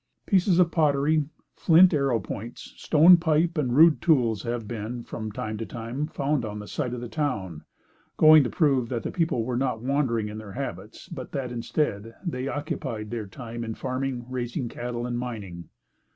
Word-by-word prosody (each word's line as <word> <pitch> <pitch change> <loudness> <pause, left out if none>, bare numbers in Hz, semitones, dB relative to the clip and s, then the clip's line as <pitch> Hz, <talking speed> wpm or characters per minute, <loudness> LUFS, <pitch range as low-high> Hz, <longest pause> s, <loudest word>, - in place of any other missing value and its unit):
Pieces 185 -3 +3
of 175 -2 +4
pottery, 150 -1 +2 0.3
flint 175 +2 +6
arrow 135 -5 +1
points; 115 +4 -8
stone 170 +3 +6
pipe 165 +1 +1
and 130 -6 0
rude 160 +1 +6
tools 120 - +2
have 120 -2 -4
been, 115 +2 -5
from 110 -2 -6
time 110 +1 -5
to - - -2
time, 120 +8 -4
found 140 -2 -1
on 105 -1 -5
the 105 - -7
site 125 -5 -3
of 120 - -6
the 120 - -5
town, 110 - -3 0.5
going 155 -1 +8
to 125 - -2
prove 135 -8 +1
that 120 -3 -3
the - - -3
people 165 -9 0
were 125 0 -2
not 125 -3 -1
wandering 130 -5 0
in 105 +1 -7
their 105 -3 -10
habits, - - -7
but - - -8
that 130 -3 -3
instead, 115 -2 -2
they 130 -6 -3
occupied 130 -7 -4
their 115 -3 -4
time 115 +3 -7
in 110 -1 -5
farming, 130 -1 -3
raising 125 0 -3
cattle 120 0 -5
and 120 -1 -3
mining. 100 -9 -7
125 Hz, 180 wpm, -26 LUFS, 115-150 Hz, 0.5 s, going